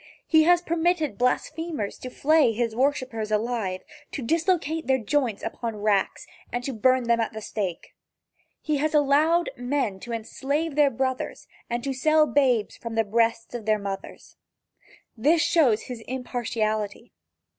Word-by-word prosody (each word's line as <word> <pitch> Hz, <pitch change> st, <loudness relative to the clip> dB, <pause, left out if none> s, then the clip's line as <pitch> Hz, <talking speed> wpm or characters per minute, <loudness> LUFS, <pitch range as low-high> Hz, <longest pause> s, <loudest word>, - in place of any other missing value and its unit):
He 315 Hz, -1 st, +5 dB
has 350 Hz, +1 st, +4 dB
permitted 335 Hz, -3 st, 0 dB
blasphemers 295 Hz, -1 st, -1 dB
to 255 Hz, -, -6 dB
flay 295 Hz, -2 st, +3 dB
his 230 Hz, 0 st, -1 dB
worshipers 255 Hz, -4 st, 0 dB
alive, 215 Hz, -4 st, -1 dB, 0.3 s
to 275 Hz, -, -4 dB
dislocate 325 Hz, +1 st, 0 dB
their 265 Hz, 0 st, +4 dB
joints 245 Hz, -2 st, -1 dB
upon 230 Hz, -2 st, -4 dB
racks, 205 Hz, -2 st, +1 dB, 0.3 s
and 245 Hz, +1 st, -3 dB
to 270 Hz, -, -3 dB
burn 255 Hz, +3 st, +3 dB
them 235 Hz, 0 st, +2 dB
at 225 Hz, 0 st, -1 dB
the 220 Hz, -, -5 dB
stake. 200 Hz, -5 st, -4 dB, 0.7 s
He 305 Hz, -1 st, 0 dB
has 310 Hz, +2 st, 0 dB
allowed 300 Hz, +4 st, +3 dB
men 245 Hz, -6 st, -1 dB
to 240 Hz, -, -8 dB
enslave 280 Hz, +7 st, -2 dB
their 295 Hz, -1 st, +5 dB
brothers 260 Hz, +1 st, -3 dB, 0.2 s
and 240 Hz, 0 st, -2 dB
to 275 Hz, -, -2 dB
sell 310 Hz, +3 st, +4 dB
babes 255 Hz, -7 st, +1 dB
from 230 Hz, -1 st, -6 dB
the 225 Hz, -, +3 dB
breasts 230 Hz, +2 st, 0 dB
of 230 Hz, -3 st, -6 dB
mothers. 195 Hz, -1 st, -7 dB, 0.8 s
This 310 Hz, +8 st, +3 dB
shows 305 Hz, -10 st, +3 dB
his 250 Hz, -2 st, -7 dB
impartiality. 230 Hz, -3 st, -3 dB
250 Hz, 145 wpm, -25 LUFS, 225-300 Hz, 0.8 s, He